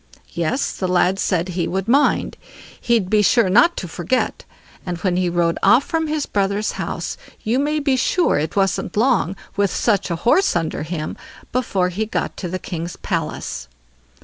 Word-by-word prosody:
Yes! 170 - -1
the 185 - -2
lad 180 +1 +2
said 180 -2 0
he 175 -1 -1
would 190 +2 -2
mind; 280 +5 +2 0.5
he'd 230 -6 +2
be 210 +2 +3
sure 210 -1 +3
not 240 - +5
to 180 - -4
forget; 175 +9 -2 0.4
and 180 -2 -4
when 180 0 0
he 180 -1 +1
rode 170 -1 +1
off 250 +3 +5
from 320 +1 -1
his 300 -1 -1
brothers' 200 +1 0
house, - - -4 0.3
you 235 +4 +1
may 300 +2 0
be 280 -3 +1
sure 300 - +2
it 155 - -3
wasn't 195 -1 0
long, 230 -6 +2 0.2
with 200 -1 +2
such 205 -2 +1
a 170 - 0
horse 375 - +4
under 165 -2 -1
him, 155 -1 -4 0.3
before 200 -7 0
he 210 +5 -2
got - - -2
to 180 - -4
the 185 - -2
king's 170 -2 -5
palace. 60 - -4
195 Hz, 175 wpm, -20 LUFS, 175-240 Hz, 0.5 s, not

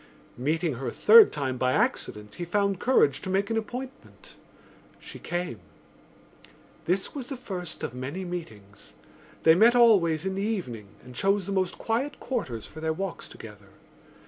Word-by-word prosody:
Meeting 155 +4 0
her 135 - -5
a - - -2
third 455 -2 +7
time 130 -4 -3
by 130 0 +2
accident 105 -4 -1
he 175 - -6
found 200 +2 0
courage 145 - +3
to - - -6
make 195 +3 0
an - - 0
appointment. 255 +4 -7 0.6
She - - -11
came. 175 -9 -4 1.3
This 190 +3 -1
was 270 -4 -6
the 270 - -6
first 180 -9 -6
of - - -3
many 140 +9 -5
meetings; 110 - -9 0.5
they 160 - +7
met 225 +8 +5
always 190 -9 +4
in 190 - -1
the 195 - -3
evening 170 - -3 0.2
and 125 - -12
chose 195 +8 +1
the 200 - -5
most 185 -2 -1
quiet 255 +6 -2
quarters 130 - -4
for 160 - -11
their 160 0 0
walks 190 +2 -5
together. 105 -3 -13
180 Hz, 165 wpm, -27 LUFS, 130-205 Hz, 1.3 s, third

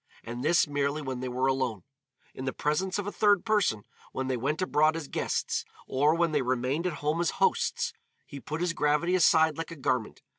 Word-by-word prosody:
And 120 +2 -6
this 170 +1 +4
merely 145 +1 -1
when 130 -2 -4
they 130 0 -4
were 125 +1 -1
alone. 130 -6 0 0.5
In 130 - -7
the 130 - -2
presence 180 +6 -1
of 205 - -3
a 205 - -3
third 205 -2 +3
person, 205 - +1 0.3
when 130 0 -3
they 130 - +1
went 140 +6 -1
abroad 155 -4 +2
as 165 -3 -5
guests, - - -1 0.2
or 145 +4 +2
when 170 -1 +1
they 150 -2 +1
remained 130 +6 0
at 180 - -2
home 155 +3 +1
as 170 - +1
hosts, - - +1 0.3
he 140 - -9
put 155 +4 -5
his 175 -1 0
gravity 150 +3 +1
aside 160 -3 +4
like 165 - -4
a 165 - -7
garment. 125 -5 -2
150 Hz, 210 wpm, -28 LUFS, 130-170 Hz, 0.5 s, this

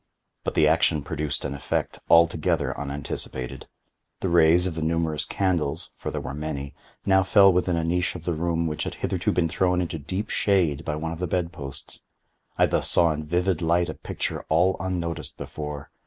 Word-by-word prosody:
But - - -3
the - - +5
action 75 -2 +3
produced 75 -1 -3
an 70 - -2
effect 70 0 -2
altogether 85 -2 +3
unanticipated. 70 -2 -4 0.5
The 95 - 0
rays 85 +1 +5
of 90 - -1
the 80 - -4
numerous 80 -1 0
candles 85 -4 -1
(for - - -5
there - - -3
were 65 - -5
many) 70 -1 -4 0.3
now 95 -1 +5
fell 95 0 +6
within 90 0 +1
a 85 - 0
niche 85 +2 0
of 85 -2 -8
the 85 - 0
room 85 +1 0
which 75 -2 -2
had - - -4
hitherto - - -1
been 85 -2 +1
thrown 90 +1 +1
into 85 -3 -2
deep 95 +8 -4
shade 85 -7 +2
by 75 -1 -2
one 80 +2 -3
of 85 - -6
the 90 - -1
bed 85 0 -1
posts. 70 -3 -8 0.6
I - - +5
thus - - 0
saw 85 -2 +4
in 75 0 -6
vivid 90 +1 +1
light 85 +1 +2
a - - -3
picture - - -4
all 90 +4 +3
unnoticed 90 -3 -3
before. 75 -2 -6
85 Hz, 190 wpm, -25 LUFS, 75-90 Hz, 0.6 s, fell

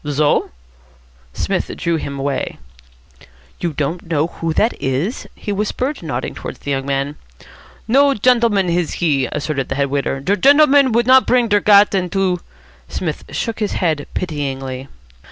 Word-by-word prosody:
"Zo?" 145 +1 +2 0.8
Psmith - - -2
drew 170 -1 0
him 140 -2 -5
away. 135 0 -2 1.0
"You 170 - -1
don't 160 +4 -3
know 155 -2 +1
who 165 -1 -4
that 225 - +2
is?" 135 - -2
he 205 - -5
whispered, 230 +8 -2
nodding 135 -7 -4
towards - - -7
the 145 - -5
young 135 0 -2
man. 140 +1 -2 0.7
"No 275 +3 +4
gendleman 230 -4 +3
he 165 -5 0
is," - - -6
asserted 150 -2 -3
the 130 - -2
head 140 -1 0
waiter. 140 -1 -1
"Der 195 +9 0
gendleman 285 +2 +5
would 235 +1 +3
not 260 +1 +6
der 235 -4 +3
gat 205 0 +5
into 185 -1 0 0.3
" 65 -1 -28
Psmith 160 -5 -4
shook 230 -1 -3
his 210 -2 -1
head 155 -6 -1
pityingly. 135 -5 -4
170 Hz, 155 wpm, -18 LUFS, 140-210 Hz, 1.0 s, not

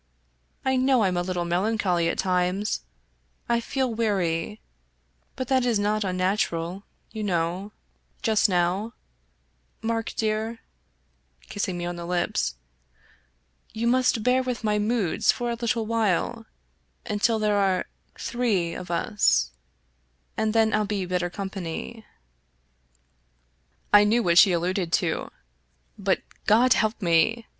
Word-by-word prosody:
I 265 0 +2
know 260 -1 +3
Fm 185 -3 +1
a 175 - +1
little 175 -1 -2
melancholy 180 -1 +1
at - - -2
times 185 - 0 0.3
— - - -42 0.3
I 235 0 +2
feel 260 0 -1
weary; 200 -3 -1 0.8
but 260 -2 -4
that 260 -2 +3
is 240 -3 +2
not 210 +1 0
unnatural, 185 -1 -1 0.3
you 220 - -5
know, 180 +1 -1 0.5
just 220 -2 +3
now, 185 +5 0 0.9
Mark 225 0 -1
dear" 220 +1 -1 0.5
— 65 0 -43
kissing 190 -3 -2
me 175 - -4
on 175 0 -4
the 170 0 -6
lips 175 - -1 0.4
— - - -34
" 65 - -37
you 225 +1 -2
must 250 -2 +2
bear 250 +2 +3
with 250 -3 -4
my 210 -1 +1
moods 210 -4 +2
for 240 -1 -3
a 235 - -3
little 235 -1 0
while, 225 +1 0 0.6
until 220 +1 +1
there 210 -1 +1
are 190 -2 +1 0.3
three 210 -9 -1
of 180 - -7
us, 170 - +2 0.8
and 220 0 0
then 220 0 +3
I'll 215 - +2
be 200 -2 -2
better 180 0 -1
company." 195 +3 -6 1.9
I 205 0 +8
knew 230 +3 +2
what 170 -1 +5
she 195 - +7
alluded 175 0 -1
to, - - 0 0.7
but, - - 0 0.2
God 240 +4 +5
help 215 +1 0
me! 175 +7 +2
205 Hz, 135 wpm, -25 LUFS, 175-225 Hz, 1.9 s, I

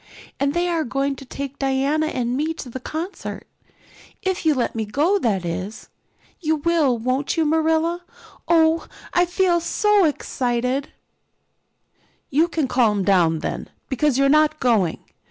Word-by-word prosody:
And 280 +2 0
they 350 +1 +1
are 335 -2 0
going 275 +2 -1
to 270 - -10
take 275 +2 -6
Diana 275 +3 +1
and 245 -4 -2
me 310 +4 -1
to 250 - -8
the 260 - -5
concert 325 +9 -6 0.8
if 375 -3 -1
you'll 300 -3 +3
let 245 - 0
me 225 - -2
go, 300 - +1
that 200 - 0
is. 185 +5 -5 0.5
You 315 -2 +1
will, 300 -5 +2
won't 255 +7 -1
you, 325 - +2
Marilla? 320 +2 +1 0.5
Oh, 325 -1 +3 0.3
I 355 0 +4
feel 355 -1 +2
so 410 +3 +3
excited." 255 -2 -1 1.4
"You 310 +5 +3
can 320 -5 -1
calm 225 -6 +2
down 170 -5 +3
then, - - -4 0.2
because 275 0 +1
you're 275 0 +4
not 305 +1 +3
going. 215 -9 +1
280 Hz, 150 wpm, -22 LUFS, 245-325 Hz, 1.4 s, I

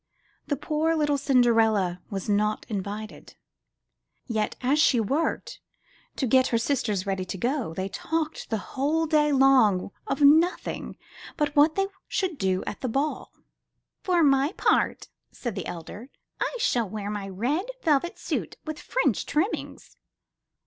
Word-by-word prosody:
Poor 315 +1 0
little 295 -2 +1
Cinderella 225 -9 +3
was 195 -3 -5
not 210 +1 +1
invited; 210 +1 -6 0.9
yet, 220 -3 -1
as 270 +4 +2
she 265 -6 +4
worked 275 +10 -1 0.6
to 270 - -1
get 260 +2 +4
her 230 - +1
sisters 225 -6 -1
ready 190 -1 -1
to 185 - -5
go, 245 - -1
they 190 +2 -2
talked 320 +9 -3
the 220 - 0 0.2
whole 300 +5 +1
day 300 -1 +3
long 260 -9 +4 0.2
of 275 - -2
nothing 320 +5 +3 0.4
but 295 -2 0
what 300 +2 +5
they 390 - +2 0.2
should 365 -6 -2
do 190 -1 0
at - - -6
the 255 - -2
ball. 275 +6 -2 0.7
'Tor 355 -3 +3
my 275 +3 +3
part," - - +1 0.2
said 240 -4 -5
the 190 -2 -5
elder, 175 - -8 0.3
*'I - - -2
shall 240 - +1
wear 205 0 -4
my 200 -2 -4
red 250 - -1 0.2
velvet 310 +2 +1
suit - - -4
with 310 -1 -5
French - - 0
trimmings." 340 +9 -3
260 Hz, 140 wpm, -26 LUFS, 210-300 Hz, 0.9 s, what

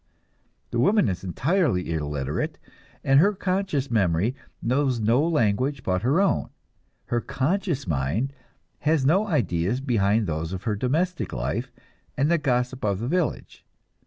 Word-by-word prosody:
The 120 - -1
woman 200 - +4
is 90 -2 -3
entirely 120 - 0
illiterate, 75 -3 -2 0.5
and 135 +1 +5
her 200 +6 +4
conscious 185 -8 -1
memory 100 +1 +2 0.3
knows 130 0 +1
no 115 +5 +3
language 130 -3 +1
but 90 -1 0
her 135 - +2
own, 200 -1 +1 0.6
her 120 0 -1
conscious 160 - -1
mind 85 - -1 0.5
has 155 -3 +2
no 190 +9 +3
ideas 120 - 0
beyond 110 -5 +1
those 80 0 -3
of 95 0 -5
her 105 - 0
domestic 160 - -1
life 75 - -3 0.5
and 145 +3 +2
the 170 - +3
gossip 125 -2 -1
of 100 -2 +1
the 115 - -3
village. 175 +2 -2
125 Hz, 140 wpm, -25 LUFS, 95-150 Hz, 0.6 s, and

